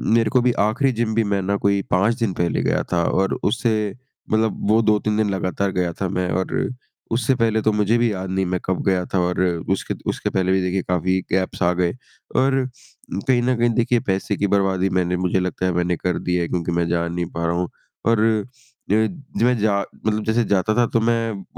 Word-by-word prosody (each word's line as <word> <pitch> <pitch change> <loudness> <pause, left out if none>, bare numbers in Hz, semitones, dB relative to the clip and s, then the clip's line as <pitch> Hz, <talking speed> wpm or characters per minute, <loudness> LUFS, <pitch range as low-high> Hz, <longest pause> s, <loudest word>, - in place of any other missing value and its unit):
मेरे 115 -2 +3
को 125 +3 +3
भी 125 - +3 0.2
आखिरी 130 +5 +1
जिम 115 -2 -1
भी 115 - +3
मैं 100 -1 0
ना, 100 +2 0
कोई 100 0 +1
5 100 +6 +3
दिन 115 -5 0
पहले 85 -2 0
गया - - +1
था, 85 -1 +2
और 95 +3 +1
उससे 110 -4 0 0.4
मतलब 110 -2 0
वो 110 +1 +5
2-3 105 0 +1
दिन 110 -1 +2
लगातार 95 0 -1
गया 90 -2 0
था 95 - +1
मैं, 90 -1 -1
और 95 +1 -1 0.4
उससे 120 +3 +2
पहले 115 -2 +1
तो 110 - +2
मुझे 105 +2 +2
भी 120 -1 +2
याद 95 -1 -4
नहीं, 95 0 0
मैं 90 0 -1
कब 95 -1 -1
गया 90 -2 +2
था 95 - +3
और 90 0 0 0.3
उसके 95 - -1
द - - -12
उसके - - -1
पहले 95 -1 0
भी, 95 0 +3
देखिए, 90 +1 0
काफ़ी 90 +1 0
गैप्स 95 +1 -1
आ 85 - +4
गए 90 -1 +1 0.4
और 135 +1 +3 0.7
कहीं 125 -2 +4
न 125 +1 +2
कहीं, 120 0 +3
देखिए, 120 0 +2
पैसे 95 +1 -1
की 100 - +1
बर्बादी 95 -1 +1
मैंने 90 0 +1
मुझे 90 +1 +1
लगता 90 0 -2
है, 90 - +2
मैंने 90 0 +1
कर 90 -2 -1
दी 90 - +2
है, 85 -1 0
क्योंकि 85 -1 -2
मैं 85 0 0
जा 85 0 0
नहीं 85 0 -2
पा 85 0 -3
रहा 85 - +1
हूँ। 90 0 -1 0.4
और 115 -1 +3
अ, 120 +2 -2 0.5
मैं 125 0 +3
जा 105 -1 +2 0.3
मतलब 110 0 0
जैसे 110 +2 +2
जाता 100 +3 +1
था, 120 - +4
तो 115 - +1
मैं 115 -3 0
100 Hz, 225 wpm, -21 LUFS, 90-115 Hz, 0.7 s, वो